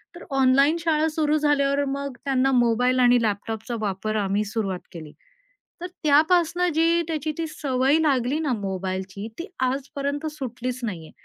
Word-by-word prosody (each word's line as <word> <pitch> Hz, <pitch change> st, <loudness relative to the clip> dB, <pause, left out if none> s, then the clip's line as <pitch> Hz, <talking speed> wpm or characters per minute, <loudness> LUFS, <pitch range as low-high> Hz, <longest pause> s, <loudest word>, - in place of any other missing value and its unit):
तर 345 Hz, -, -10 dB
ऑनलाईन 275 Hz, +4 st, +4 dB
शाळा 320 Hz, -1 st, +1 dB
सुरु 310 Hz, -1 st, +1 dB
झाल्यावर 285 Hz, -1 st, +2 dB
मग 275 Hz, -1 st, -4 dB
त्यांना 270 Hz, -1 st, +2 dB
मोबाईल 250 Hz, +1 st, +2 dB
आणि 245 Hz, -1 st, +5 dB
लॅपटॉपचा 220 Hz, +2 st, -3 dB
वापर 210 Hz, +1 st, -2 dB
आम्ही 200 Hz, +1 st, 0 dB
सुरुवात 200 Hz, -3 st, -3 dB
केली. 160 Hz, -4 st, -9 dB, 0.7 s
तर 355 Hz, -, -3 dB, 0.2 s
त्यापासनं 335 Hz, +4 st, +3 dB
जी 335 Hz, +1 st, +3 dB
त्याची 310 Hz, -1 st, -2 dB
ती 330 Hz, -, -2 dB
सवय 275 Hz, -1 st, +1 dB
लागली 275 Hz, -2 st, +1 dB
ना, 300 Hz, -5 st, -1 dB
मोबाईलची 190 Hz, 0 st, -4 dB
ती 340 Hz, -, -4 dB, 0.2 s
आजपर्यंत 280 Hz, +3 st, -2 dB
सुटलीच 255 Hz, -3 st, -5 dB
नाहीये. 170 Hz, -8 st, -5 dB
265 Hz, 145 wpm, -24 LUFS, 220-305 Hz, 0.7 s, आणि